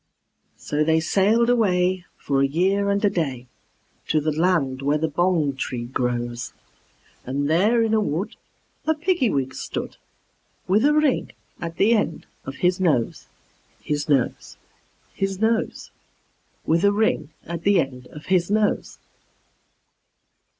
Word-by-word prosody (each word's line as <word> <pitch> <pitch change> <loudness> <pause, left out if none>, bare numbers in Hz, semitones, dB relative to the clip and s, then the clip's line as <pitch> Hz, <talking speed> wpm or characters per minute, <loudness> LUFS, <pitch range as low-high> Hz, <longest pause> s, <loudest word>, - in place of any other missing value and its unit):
They 155 +2 +3
sailed 205 +7 +2
away 185 -6 +2
for 135 -1 0
a 140 - +3
year 190 +7 +1
and 200 +1 +1
a - - +5
day, 135 -8 -2 0.6
To 155 - +2
the 155 +1 0
land 150 -5 +1
where 145 +2 +1
the 160 +1 0
bong 160 -3 +1
tree 125 -2 -4
grows; 120 -1 -3 0.7
And 140 +3 -2
there 210 +9 +3
in 225 - 0
the 220 - +3
wood 185 -1 -2 0.5
a 315 - +3
Piggy 335 -5 +1
wig 135 -6 -1
stood, - - -5 0.7
With 205 +7 +3
a 295 - +4
ring 305 -3 +1 0.3
at 170 -1 -5
the 215 +5 +4
end 205 -8 -1 0.2
of 135 - -6
his 180 +1 +2
nose, 150 -11 0 0.5
His 145 0 -3
nose, 135 -4 0 0.6
His 195 -1 -2
nose, 225 +1 -1 0.7
With 165 +3 +2
a 200 - +5
ring 205 -8 0 0.2
at 170 0 -5
the 200 +1 +3
end 130 -4 -3
of 150 +3 -12
his 180 -2 +1
nose. 210 0 0
170 Hz, 140 wpm, -23 LUFS, 145-200 Hz, 0.7 s, a